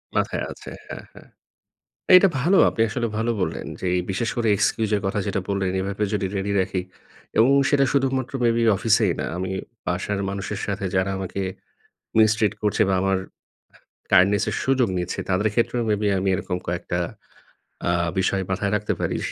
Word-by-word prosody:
মাথায় - - 0
আছে, - - -10 0.2
হ্যাঁ, - - -8
হ্যাঁ। - - -16 0.9
এটা 195 +2 +7
ভালো। 180 +9 +3
আপনি 115 - 0
আসলে 120 +2 -2
ভালো 115 +1 0
বললেন 90 - -2
যে 95 - -3
এই 90 - 0
বিশেষ 110 +5 -1
করে 115 -2 +1
এক্সকিউজ 105 +1 +1
এর - - -2
কথা 95 - -1
যেটা 100 0 -1
বললেন 95 -2 0
এভাবে 100 +2 -2
যদি 100 -2 0
রেডি 100 +1 -1
রাখি 95 0 -1 0.6
এবং 115 +4 +6 0.2
সেটা 140 -1 +3
শুধুমাত্র 135 -2 0
মেবি 115 0 +2
অফিসেই 105 -2 +3
না। - - -2
আমি 95 +1 -3 0.4
বাসার 100 +3 -1
মানুষের 100 +1 -4
সাথে 100 -1 -3
যারা 95 +1 +1
আমাকে 95 +1 -4 0.8
মিস্ট্রিট 110 -1 +4
করছে 105 +1 +2
বা 95 - +2
আমার 95 0 +2 0.9
কাইন্ডনেস 100 +2 +5
এর - - -3
সুযোগ 130 -3 +2
নিচ্ছে। 90 0 -3
তাদের 105 +4 +2
ক্ষেত্রেও 120 +1 +1
মেবি 105 0 +1
আমি 95 +1 -1
এরকম 90 0 -2
কয়েকটা 85 0 -2 0.9
আ - - +3 0.3
বিষয় 95 0 +1
মাথায় 100 +2 -1
রাখতে 105 0 -1
পারি। - - -1
100 Hz, 170 wpm, -23 LUFS, 95-115 Hz, 0.9 s, এটা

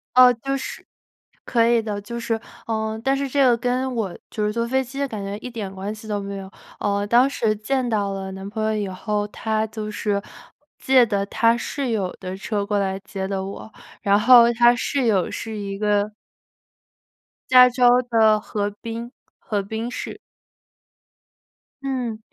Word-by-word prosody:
哦， 250 -1 +9
就 275 +4 -3
是 265 - -7 0.6
可 230 -2 +3
以 235 -1 +4
的， 205 -2 -4
就 235 +3 -6
是 230 -1 -1 0.3
呃， 220 -1 -2
但 270 +1 +2
是 275 0 -2
这 275 +1 +2
个 240 -2 +4
跟 250 +2 -1
我 200 -6 -3
就 210 -2 -2
是 210 - 0
坐 230 +1 -1
飞 265 +2 +1
机 270 +2 -8
的 280 - 0
感 215 -6 -6
觉 200 +1 -4
一 250 - -7
点 210 -5 -6
关 195 +2 -5
系 220 +1 -11
都 210 -1 -1
没 200 0 -5
有。 190 0 -8 0.3
呃， 200 0 0
当 245 +5 +5
时 220 -5 0
见 250 +4 -1
到 205 -3 0
了 190 0 -5
男 190 +1 -7
朋 215 +1 -3
友 220 0 +1
以 205 -2 -2
后， 205 +2 -2
他 220 +1 -1
就 215 0 -6
是 205 -1 -1 0.6
借 260 -2 +5
的 200 -3 -1
他 230 +3 +3
室 270 +2 -3
友 200 -5 -1
的 185 0 -5
车 200 +1 -2
过 205 0 0
来 195 -1 -1
接 195 -1 -5
的 195 -1 -2
我， 200 +3 -8 0.3
然 200 0 +3
后 235 +1 +7
他 240 +1 +5
室 270 +1 -1
友 200 -5 +2
是 225 -1 -5
一 200 -1 -4
个 210 0 +1 1.4
加 250 -1 +9
州 245 0 +4
的 220 -3 +3
河 205 -1 -2
滨， 230 +1 -5 0.3
河 205 -3 -2
滨 220 +4 -4
市。 245 - -6 1.7
嗯， 250 -5 -2
220 Hz, 195 characters per minute, -22 LUFS, 205-240 Hz, 1.7 s, 哦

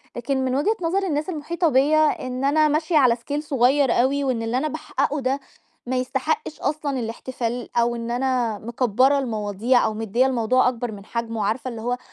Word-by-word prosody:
لكن 260 +2 -1
من 255 0 0
وجهة 355 +11 +1
نظر 370 +4 +1
الناس 300 0 -1
المحيطة 335 +1 -1
بيّ 280 +3 +3
ا 310 -4 +2
إن 255 +1 -4
أنا 305 +2 +4
ماشية 310 +2 +1
على 255 -5 +5
scale 265 +5 -4
صغير 275 -2 +2
أوي، 270 +4 +2
وإن 255 -4 0
اللي 225 +2 -1
أنا 290 +4 0
باحققه 285 0 -2
ده 265 +2 0 0.5
ما 260 - -1
يستحقش 280 - -2
أصلًا 285 -2 -1
الاحتفال، 240 +1 -4
أو 235 0 +2
إن 230 0 -4
أنا 245 -4 0
مكبرة 250 +4 +2
المواضيع 220 0 +1
أو - - 0
مدية 225 +3 +1
الموضوع 255 -1 +2
أكبر 245 -1 -4
من 200 -2 -10
حجمه. 230 -1 -4
وعارفة 220 +5 -1
اللي 230 -2 -7
هو 245 +2 -1
255 Hz, 190 wpm, -23 LUFS, 235-285 Hz, 0.5 s, على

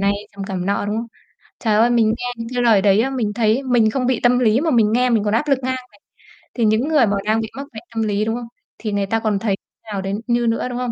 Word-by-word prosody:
này, 200 0 +2 0.2
trầm 200 -1 -6
cảm 190 -2 -4
nọ, 200 +1 0
đúng 210 +1 -2
không? 230 +1 -3 0.5
Trời 220 -3 0
ơi, 230 +3 +4
mình 235 -2 +3
nghe - - -4
những 230 0 -6
cái 245 - 0
lời 220 -5 +4
đấy 200 0 +4
á, 270 - -1
mình 230 -6 -1
thấy 225 +3 +2
mình 240 -4 +3
không 250 +2 -1
bị 255 -2 +1
tâm 245 0 +4
lý 230 0 +3
mà 320 0 0
mình 220 -4 +3
nghe 250 +1 +2
mình 220 -3 +2
còn 210 - 0
áp 265 +7 0
lực 275 -2 +3
ngang 260 +1 -1
này. 250 -1 -11 0.7
Thì 235 - 0
những 220 +5 +2
người 300 -6 +4
mà 200 0 0
đang 215 +1 +2
bị 220 - -4
mắc 280 +1 -6
bệnh 220 - -9
tâm 225 - 0
lý, 210 0 0
đúng 225 +1 -1
không? 240 -1 -6 0.3
Thì 215 - -4
người 200 -1 0
ta 225 +3 0
còn 215 -3 0
thấy 200 -2 0 0.4
nào 195 - -2
đến 195 +3 -3
như 240 -1 +1
nữa, 230 +2 0
đúng 245 - -4
không? 250 -1 -2
225 Hz, 295 wpm, -20 LUFS, 210-245 Hz, 0.7 s, ơi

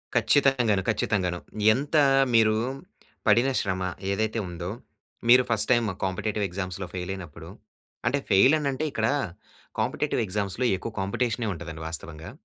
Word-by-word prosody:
ఖచ్చితంగాగను, 125 -8 +3
ఖచ్చితంగాను. 90 -5 0 0.3
ఎంతా 145 +4 +2 0.3
మీరు 110 -1 +5 0.7
పడిన 120 +5 +5
శ్రమ 95 -2 -2 0.3
ఏదైతే 110 +3 -1
ఉందో, 85 0 -5 0.6
మీరు 125 +1 +8
ఫస్ట్ 110 -2 0
టైమ్ 120 -2 +3 0.2
కాంపిటేటివ్ 100 +2 -2
ఎగ్జామ్స్‌లో 95 0 -5
ఫెయిలైయినప్పుడు 90 -3 -6 0.6
అంటే 140 +4 +2
ఫెయిలని 135 +10 +5
అంటే 135 +3 -3
ఇక్కడ - - 0 0.7
కాంపిటేటివ్ - - 0
ఎగ్జామ్స్‌లో 100 +3 -2
ఎక్కువ 115 - -6
కాంపిటీషనే 115 +4 -1
ఉంటదండి 80 -2 -8
వాస్తవంగా. 80 0 -7
105 Hz, 115 wpm, -26 LUFS, 90-120 Hz, 0.7 s, మీరు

